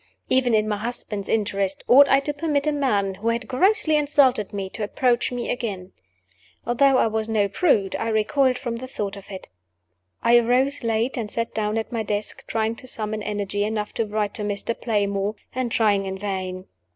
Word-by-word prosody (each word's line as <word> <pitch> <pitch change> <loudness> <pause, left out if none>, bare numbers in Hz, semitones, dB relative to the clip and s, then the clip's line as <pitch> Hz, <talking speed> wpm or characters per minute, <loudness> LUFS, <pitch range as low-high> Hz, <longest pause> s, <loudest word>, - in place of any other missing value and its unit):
Even 250 -3 +3
in 215 0 +2
my 210 -1 -1
husband's 210 -3 -5
interests, 200 -3 -1
ought 280 +3 +7
I 270 - +5
to 295 +1 -2
permit 290 -1 -1
a 305 - +2
man 210 -10 0
who 210 +4 -6
had 230 +1 0
grossly 315 +4 +3
insulted 280 -7 +2
me 195 -2 -4
to 220 - -5
approach 240 +3 +1
me 245 -1 -3
again? 200 -7 -4 0.7
Although 265 +3 +4
I - - +4
was 220 0 -1
no 210 -2 +2
prude, 200 - +1
I 225 - -2
recoiled 250 +4 +2
from 235 -2 -4
the 255 +2 -7
thought 205 -6 -4
of 200 0 -12
it. 190 -2 -8 0.8
I 240 +1 +6
arose 255 +4 +1
late, 230 +3 0
and 225 -3 -3
sat 230 +2 -3
down 215 0 -1
at 225 - -3
my 230 -2 -1
desk, 210 0 -4
trying 220 0 -1
to 255 - -7
summon 215 -2 -3
energy 205 -1 -2
enough 210 0 -3
to 230 - -1
write 210 -1 -1
to - - -3
Mr. 205 +2 -1
Playmore 205 -2 -1 0.2
and 255 -2 -2
trying 205 -4 +2
in 190 0 -4
vain. 185 -2 -4
220 Hz, 195 wpm, -23 LUFS, 205-250 Hz, 0.8 s, ought